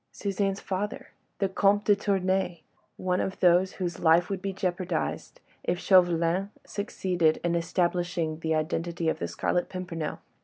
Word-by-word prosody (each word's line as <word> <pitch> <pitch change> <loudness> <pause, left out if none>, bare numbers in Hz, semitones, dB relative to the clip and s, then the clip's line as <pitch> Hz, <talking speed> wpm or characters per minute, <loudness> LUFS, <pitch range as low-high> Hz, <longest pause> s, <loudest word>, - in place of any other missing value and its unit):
Suzanne's 195 -1 -1
father! 200 +2 -4 0.3
the 195 - +1
Comte 200 +2 +2
de 205 - +5
Tournay!—one 185 -2 -2
of 190 - -3
those 180 +1 +4
whose 175 -3 -4
life 170 +3 +4
would 190 -2 -2
be 195 0 -2
jeopardised 185 - -3 0.2
if 175 - 0
Chauvelin 175 0 +3 0.2
succeeded 180 -6 0
in 175 -1 +1
establishing 170 -2 0
the 160 -1 0
identity 165 +1 -1
of - - -2
the - - -2
Scarlet 175 - -1
Pimpernel. 175 -4 -4
180 Hz, 140 wpm, -28 LUFS, 170-195 Hz, 0.3 s, de